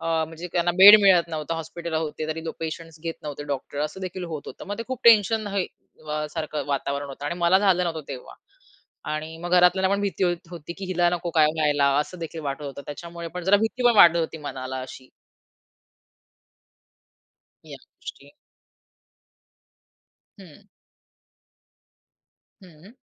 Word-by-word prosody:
अ, -, -, -5 dB, 0.2 s
म्हणजे 165 Hz, +2 st, -8 dB
त्यांना 175 Hz, 0 st, +1 dB
बेड 210 Hz, +2 st, +11 dB
मिळत 180 Hz, -4 st, +5 dB
नव्हता 160 Hz, 0 st, -4 dB
हॉस्पिटल 165 Hz, +1 st, -6 dB
होते, 155 Hz, -1 st, -3 dB
तरी 160 Hz, +1 st, -4 dB, 0.2 s
पेशंट्स 165 Hz, 0 st, -6 dB
घेत 165 Hz, -1 st, -3 dB
नव्हते 145 Hz, -1 st, -6 dB
डॉक्टर 140 Hz, +1 st, -8 dB
असंदेखील 185 Hz, +3 st, -6 dB
होत 145 Hz, -, -6 dB
होतं. -, -, -10 dB
मग 205 Hz, +2 st, -5 dB
ते -, -, -2 dB
खूप 260 Hz, -2 st, -4 dB
टेन्शन 220 Hz, -1 st, +5 dB
हे 185 Hz, -, +1 dB, 0.6 s
सारखं 155 Hz, -3 st, -4 dB
वातावरण 140 Hz, 0 st, -2 dB
होतं. 140 Hz, +1 st, -9 dB
आणि 160 Hz, -, -2 dB
मला 175 Hz, +2 st, +4 dB
झालं 190 Hz, -3 st, +2 dB
नव्हतं 160 Hz, -4 st, -4 dB
तेव्हा 130 Hz, -3 st, -8 dB, 0.8 s
आणि 155 Hz, +1 st, -5 dB
मग 175 Hz, +1 st, -6 dB
घरातल्यांना 180 Hz, +2 st, +4 dB
पण 200 Hz, -, -3 dB
भीती 200 Hz, -1 st, -1 dB
होत 175 Hz, -2 st, -1 dB
होती 170 Hz, -1 st, -8 dB
की 195 Hz, -, -6 dB
हिला 175 Hz, -1 st, +2 dB
नको 175 Hz, 0 st, -3 dB
काय 155 Hz, -2 st, +5 dB
व्हायला 145 Hz, -3 st, +2 dB
असंदेखील 165 Hz, +1 st, -4 dB
वाटत 140 Hz, 0 st, -4 dB
होतं. 140 Hz, 0 st, -7 dB
त्याच्यामुळे 170 Hz, +3 st, -8 dB
पण 180 Hz, -, -4 dB
जरा 195 Hz, +3 st, +5 dB
भीती 225 Hz, +4 st, -2 dB
पण 240 Hz, -1 st, +5 dB
वाढत 170 Hz, -4 st, +7 dB
होती 160 Hz, 0 st, -3 dB
मनाला 130 Hz, 0 st, -5 dB
अशी. 130 Hz, 0 st, -10 dB, 2.6 s
या -, -, -10 dB
गोष्टी. -, -, -12 dB, 2.1 s
हं. 190 Hz, +2 st, -16 dB, 2.0 s
हं. 180 Hz, +6 st, -17 dB
170 Hz, 150 wpm, -24 LUFS, 150-185 Hz, 2.6 s, बेड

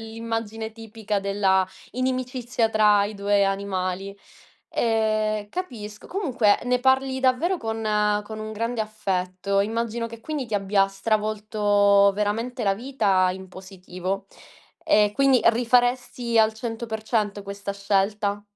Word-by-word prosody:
l'immagine 225 Hz, 0 st, -5 dB
tipica 220 Hz, -2 st, -4 dB
della 195 Hz, -1 st, +2 dB, 0.3 s
inimicizia 255 Hz, -2 st, -1 dB
tra 210 Hz, -2 st, +4 dB
i 215 Hz, -, -7 dB
2 200 Hz, 0 st, +2 dB
animali. 195 Hz, 0 st, -2 dB, 0.6 s
Ehm, 215 Hz, -2 st, 0 dB
capisco. 215 Hz, -, -7 dB
Comunque, 255 Hz, -, +2 dB
ne 250 Hz, 0 st, +2 dB
parli 265 Hz, +1 st, +2 dB
davvero 260 Hz, +8 st, +2 dB
con 225 Hz, -6 st, -4 dB, 0.4 s
con 220 Hz, +1 st, -8 dB
un 215 Hz, 0 st, -6 dB
grande 230 Hz, +1 st, -2 dB
affetto. 195 Hz, -2 st, -2 dB
Immagino 230 Hz, +2 st, -2 dB
che, 230 Hz, 0 st, -10 dB
quindi, 300 Hz, +1 st, -4 dB
ti 230 Hz, -, -12 dB
abbia 195 Hz, 0 st, +2 dB
stravolto 205 Hz, -1 st, +2 dB
veramente 225 Hz, +5 st, -2 dB
la 195 Hz, -2 st, +2 dB
vita 200 Hz, -6 st, +1 dB
in 190 Hz, 0 st, -9 dB
positivo. 185 Hz, +1 st, -6 dB, 0.6 s
E 210 Hz, -1 st, +5 dB
quindi 270 Hz, -1 st, +4 dB
rifaresti 245 Hz, 0 st, +2 dB
al 220 Hz, 0 st, +5 dB
100% 220 Hz, -2 st, -3 dB
questa 200 Hz, 0 st, -5 dB
scelta? 200 Hz, +1 st, 0 dB
215 Hz, 120 wpm, -24 LUFS, 200-235 Hz, 0.6 s, E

